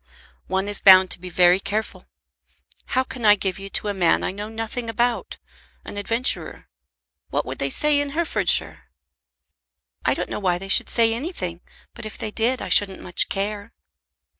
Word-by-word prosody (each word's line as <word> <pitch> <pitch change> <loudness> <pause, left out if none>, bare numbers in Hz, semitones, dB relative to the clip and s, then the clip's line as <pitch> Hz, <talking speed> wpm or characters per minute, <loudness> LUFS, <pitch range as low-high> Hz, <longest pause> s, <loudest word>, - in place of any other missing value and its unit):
"One 190 +1 -1
is 205 -1 -1
bound 185 -1 +7
to - - -1
be 180 +1 -8
very 180 +1 +4
careful. 215 +2 -4 0.9
How 260 - +4
can 250 -2 -9
I 210 -1 +7
give 190 -2 -3
you 195 0 -8
to 210 - 0
a 205 - -1
man 180 -4 +2
I - - -1
know 205 +2 -7
nothing 225 +1 -4
about, 235 +1 -1 0.5
an - - -8
adventurer? 205 -4 -1 0.6
What - - -1
would - - -7
they 140 - -1
say 295 - +2
in 285 - -3
Herefordshire?" 175 - 0 1.2
"I - - +1
don't - - -5
know - - -3
why 180 -3 0
they 195 +2 -9
should - - +2
say 230 -1 +3
anything, 225 - -5 0.3
but 235 -2 -8
if 215 - -10
they 215 - -5
did 240 +4 0
I - - -5
shouldn't 195 -2 +3
much 175 - 0
care." 205 +2 -4
205 Hz, 180 wpm, -22 LUFS, 185-230 Hz, 1.2 s, bound